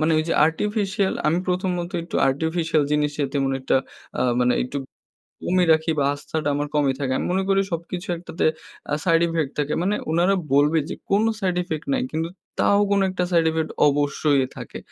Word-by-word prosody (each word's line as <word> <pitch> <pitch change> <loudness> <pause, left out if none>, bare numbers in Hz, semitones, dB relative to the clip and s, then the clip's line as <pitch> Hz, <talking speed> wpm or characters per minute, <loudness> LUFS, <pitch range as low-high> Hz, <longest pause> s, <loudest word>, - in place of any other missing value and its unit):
মানে 155 +1 +2
ঐ - - +3
যে - - +1
আর্টিফিশিয়াল; 200 +3 -1
আমি 160 +3 +2
প্রথমত 180 -1 -1
একটু 170 - -5
আর্টিফিশিয়াল 160 +2 0
জিনিসে 150 0 0
তেমন 135 -2 0
একটা 130 - +1 0.4
আ - - 0 0.2
মানে, 125 0 +3
একটু 125 +3 -5 0.7
কমই 185 0 +2
রাখি 160 +1 +1
বা 140 - +2
আস্থাটা 145 +1 -4
আমার 145 +1 -1
কমই 140 -2 +3
থাকে। 130 -2 -1
আমি - - -2
মনে 190 +1 +1
করি 195 0 +3
সবকিছু 175 +3 -4
একটাতে 175 0 -4 0.5
আ - - +3
সাইড 165 -2 +4
ইফেক্ট 160 -4 -1
থাকে। 145 0 0
মানে 200 +3 +1 0.2
উনারা 175 +4 +3 0.2
বলবে 150 +3 +4
যে, - - -4 0.2
"কোনো 210 +3 +3
সাইড 185 -3 0
ইফেক্ট 160 -3 -5
নাই।" 260 - +1
কিন্তু 160 +1 -2 0.3
তাও 200 - +4
কোনো 200 -1 +3
একটা 180 -1 -1
সাইড 165 -1 +4
ইফেক্ট 160 0 -2 0.2
অবশ্যই 145 -1 +1
থাকে। - - -8
165 Hz, 185 wpm, -23 LUFS, 145-185 Hz, 0.7 s, সাইড